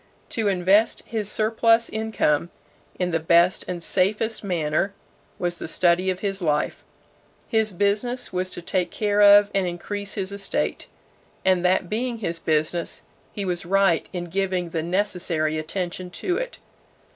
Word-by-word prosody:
To 225 -2 -1
invest 195 +3 +3
his 210 -3 -3
surplus 225 +1 +3
income 205 -8 0 0.5
in 180 -1 -1
the 165 - +1
best 170 +3 +3
and 175 -2 -4
safest 210 +6 0
manner 175 +1 -1 0.4
was 175 -1 -2
the - - -5
study 175 +3 +2
of 185 0 -2
his 195 -1 -2
life. 150 -3 -1 0.6
His 220 -2 +1
business 205 +6 0
was 185 0 -1
to 175 - -4
take 180 0 0
care 205 +1 0
of 205 0 +7
and 195 -2 +1
increase 200 +3 -5
his 195 -2 -2
estate; 200 0 -2 0.6
and 185 -2 +3
that 180 0 +2
being 235 +4 -2
his 170 -6 -3
business, 160 +2 -1 0.3
he 200 - -4
was 180 -2 -1
right 195 -2 +2
in 175 -1 -4
giving 180 -1 -2
the 160 - -1
necessary 170 -4 -1
attention 180 +2 -4
to 180 - -2
it. - - -4
185 Hz, 150 wpm, -24 LUFS, 175-205 Hz, 0.6 s, of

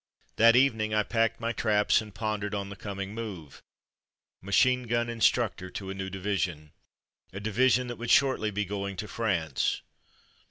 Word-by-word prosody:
That 115 +1 +6
evening 110 -5 +2
I 105 - +3
packed 115 0 0
my 115 0 -1
traps, 105 -2 +2
and 110 -1 -10
pondered 105 0 -3
on 100 -1 -4
the 100 - -8
coming 100 0 -6
move. 100 -10 -7 0.8
Machine 125 +6 +2
gun 120 0 0
in 115 - -7
structor 105 -6 +1
to 95 -1 -5
a - - -3
new 95 0 -5
division; 90 -6 -3 0.6
a 95 - -6
division 125 +4 +2
that 120 -1 -6
would 120 +1 -5
shortly 130 -6 +3
be 105 0 -2
going 100 0 -4
to 105 - -4
France. 85 - -1
105 Hz, 165 wpm, -28 LUFS, 100-115 Hz, 0.8 s, That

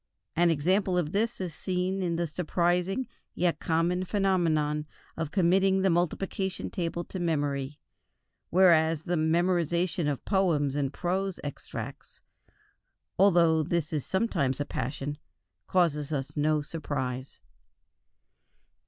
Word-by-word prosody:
An 175 +1 +4
example 180 +4 +2
of 165 -3 0
this 225 +5 0
is 180 -4 -4
seen 185 +2 -2
in 175 -2 0
the 170 +1 0
surprising 180 - 0 0.3
yet 175 -1 +1
common 170 +3 +1
phenomenon 165 -7 +1 0.3
of 160 -2 -3
committing 190 +2 +3
the 190 - +4
multiplication 185 +2 -1
table 170 -2 -2
to 190 - -7
memory, 145 -4 -1 0.7
whereas 165 -3 +4
the 175 +1 -1
memorizing 170 +1 +1
of 145 -3 -2
poems 165 -8 +2
and 140 -2 -1
prose 185 +3 -2
extracts, 145 -2 -7 1.0
although 170 -4 +5
this 160 0 -1
is 150 -4 -1
sometimes 150 - 0
a 145 - -1
passion, 145 +4 -4 0.5
causes 155 -5 +1
us 135 -2 -3
no 150 0 +1
surprise. 130 -4 -4
170 Hz, 120 wpm, -28 LUFS, 150-185 Hz, 1.0 s, although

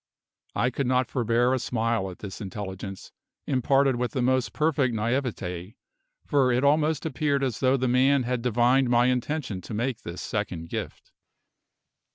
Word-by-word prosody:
I 125 - +1
could 135 -1 -2
not 125 0 +1
forbear 120 0 +2
a 130 - +1
smile 115 -4 -1
at 90 - -9
this 100 +1 -8
intelligence, 95 -1 -6 0.3
imparted 135 0 +2
with 125 0 -2
the 130 - 0
most 130 0 +1
perfect 145 -6 +1
naivete, 105 -6 -2 0.5
for 135 -3 +3
it 125 +2 +1
almost 150 +1 +2
appeared 145 -2 0
as 125 -5 -1
though 130 0 +3
the 130 0 0
man 130 +2 +3
had 125 0 -1
divined 125 +2 +3
my 120 0 +4
intention 125 -4 -1
to 105 - -7
make 120 +1 -2
this 85 +1 -7
second 90 -6 -3
gift. - - -6
125 Hz, 160 wpm, -26 LUFS, 110-135 Hz, 0.5 s, my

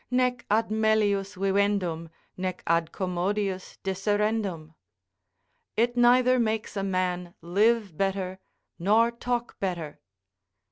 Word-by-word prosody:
"Nec 250 -1 0
ad 215 +1 +2
melius 210 -2 +2
vivendum, 195 -4 0 0.3
nec 185 -1 -4
ad 165 0 +1
commodius 190 +1 -2
disserendum." 195 -4 -1 1.0
["It 240 +2 +2
neither 250 +1 +5
makes 220 -2 -1
a 195 - -1
man 180 -2 -2
live 205 +1 +2
better 190 0 -1 0.4
nor 220 +6 +4
talk 240 0 -3
better." 175 -6 -3
200 Hz, 100 wpm, -27 LUFS, 185-220 Hz, 1.0 s, neither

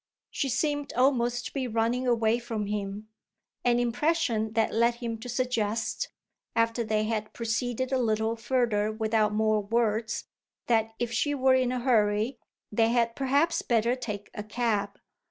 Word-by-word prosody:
She 275 - -1
seemed 290 +3 -1
almost 245 -1 +2
to - - -6
be 265 -2 -2
running 235 +3 0
away 230 -1 +2
from 225 -3 -3
him, 205 0 -4 0.6
an 240 -1 +3
impression 240 -2 0
that 225 -1 +1
led 235 +1 +3
him 235 -2 -4
to 245 - -8
suggest, 230 -3 -1 0.5
after 230 +1 +2
they 215 -1 0
had 215 -1 -2
proceeded 245 +2 -2
a 265 - +2
little 220 0 +1
further 230 -3 +1
without 220 -1 +1
more 215 0 +2
words, 220 +1 0 0.4
that 225 -1 +1
if 240 -1 -2
she 290 +4 0
were 265 -1 +4
in 255 -1 +2
a 255 - -1
hurry 225 0 +2 0.3
they 225 +1 +3
had 235 -1 +1
perhaps 280 +5 +2
better 235 +1 +2
take 210 -5 -6
a - - -5
cab. 210 -2 -1
230 Hz, 155 wpm, -28 LUFS, 220-245 Hz, 0.6 s, were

